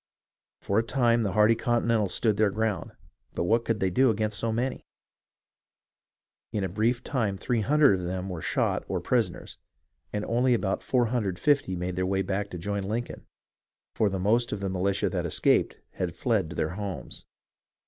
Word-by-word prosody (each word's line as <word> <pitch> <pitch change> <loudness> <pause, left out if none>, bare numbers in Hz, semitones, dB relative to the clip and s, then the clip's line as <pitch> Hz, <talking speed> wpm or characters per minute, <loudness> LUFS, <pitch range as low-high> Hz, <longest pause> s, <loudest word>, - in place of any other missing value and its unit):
For 100 +2 +1
a - - +1
time 120 -1 +2
the 100 -4 -1
hardy 105 +2 +5
Continentals 115 -3 +1
stood 110 -3 +1
their 105 -1 +4
ground, 105 -1 -2 0.4
but - - 0
what 115 +6 +2
could 115 -2 -1
they 95 -2 +1
do 130 +7 +4
against 110 -1 0
so 115 - 0
many? 125 +3 -2 1.7
In 105 - -1
a - - 0
brief 115 +6 0
time 110 -8 -1
300 125 0 +3
of 90 - -5
them 90 +1 -3
were 90 -4 -5
shot - - 0
or - - -1
prisoners, 115 -8 -1 0.5
and 105 0 -3
only 125 +2 +2
about 95 -4 -1
450 120 -1 +1
made 90 0 -3
their 90 0 0
way 95 0 0
back 100 +2 -2
to 90 - -6
join 100 +4 -3
Lincoln, 110 +5 -4 0.7
for 110 - +2
the 95 - -3
most 110 +6 +1
of 105 - -3
the 100 -1 -2
militia 95 +2 0
that 90 -3 -1
escaped 75 - +2 0.2
had 85 -3 -4
fled 110 -9 0
to 90 - -8
their 80 - 0
homes. 95 +2 -6
105 Hz, 175 wpm, -27 LUFS, 95-115 Hz, 1.7 s, hardy